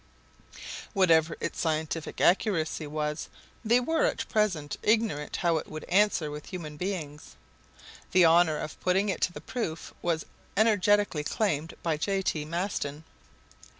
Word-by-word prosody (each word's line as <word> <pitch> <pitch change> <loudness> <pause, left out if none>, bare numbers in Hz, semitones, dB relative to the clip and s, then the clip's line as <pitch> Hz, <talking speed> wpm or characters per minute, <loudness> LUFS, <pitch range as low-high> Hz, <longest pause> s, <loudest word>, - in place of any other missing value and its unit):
Whatever 165 -5 +4
its - - -4
scientific 160 0 -2
accuracy 170 -5 +2
was, 150 +1 -3 0.3
they 235 +2 +4
were 325 - +1
at - - -1
present 185 -10 0
ignorant 215 -10 +1
how 170 -3 +2
it - - -4
would 155 0 -7
answer 185 -5 +2
with 150 0 -8
human 160 -5 -6
beings. 155 -4 -5 0.8
The 185 -1 +6
honor 165 -1 +5
of 150 - -6
putting 190 +3 +2
it 190 - -2
to - - +2
the - - -9
proof 170 -10 -4
was 165 -2 -1 0.3
energetically 205 -6 +3
claimed 165 -3 -1
by 160 -3 0
J. 195 +4 0
T. 155 -4 -1
Maston. 160 -3 -3
170 Hz, 140 wpm, -28 LUFS, 155-200 Hz, 0.8 s, The